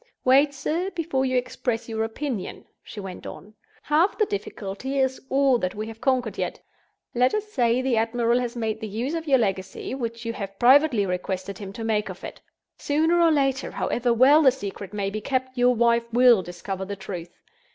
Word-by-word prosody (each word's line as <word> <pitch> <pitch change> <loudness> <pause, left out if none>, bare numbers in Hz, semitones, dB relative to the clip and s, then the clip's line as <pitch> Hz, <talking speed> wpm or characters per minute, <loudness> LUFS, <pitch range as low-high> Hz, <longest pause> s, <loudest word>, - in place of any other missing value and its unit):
"Wait, 275 +3 +5
sir, 310 +7 -2
before 300 -6 -1
you 255 0 +1
express 245 -2 -2
your 220 -1 -2
opinion," 225 -2 -4 0.2
she 210 - -10
went 190 -2 -8
on. 210 - -10 0.3
"Half 320 +7 +2
the 430 - +3
difficulty 200 - -5
is 265 -1 0
all 270 -2 +3
that 185 -3 -2
we 215 +1 -4
have 225 0 -10
conquered 255 -5 0
yet. - - -3 0.5
Let 250 - +2
us 425 0 -3
say, 245 - +2
the 255 -3 +1
admiral 235 +1 +1
has 245 -1 -3
made 220 -2 -2
the 220 - -4
use 230 +8 -3
of 330 -1 -4
your 270 -2 +5
legacy 195 -1 -2
which 235 -3 -5
you 230 - -2
have 195 -3 -7
privately 255 -3 +5
requested 185 +1 -4
him 195 -2 -7
to 225 - -6
make 215 -2 0
of - - -9
it. - - -8 0.4
Sooner 320 +4 +2
or 335 - +6
later, 270 -3 +1
however 245 0 -1
well 265 +6 +6
the 270 -4 +6
secret 200 -6 -7
may 200 -2 -2
be 215 +1 -4
kept, 260 +2 -2
your 250 0 +3
wife 235 0 +2
will 240 -3 +6
discover 180 +2 -6
the 200 +1 -5
truth. 185 -3 -7
240 Hz, 195 wpm, -24 LUFS, 210-265 Hz, 0.5 s, or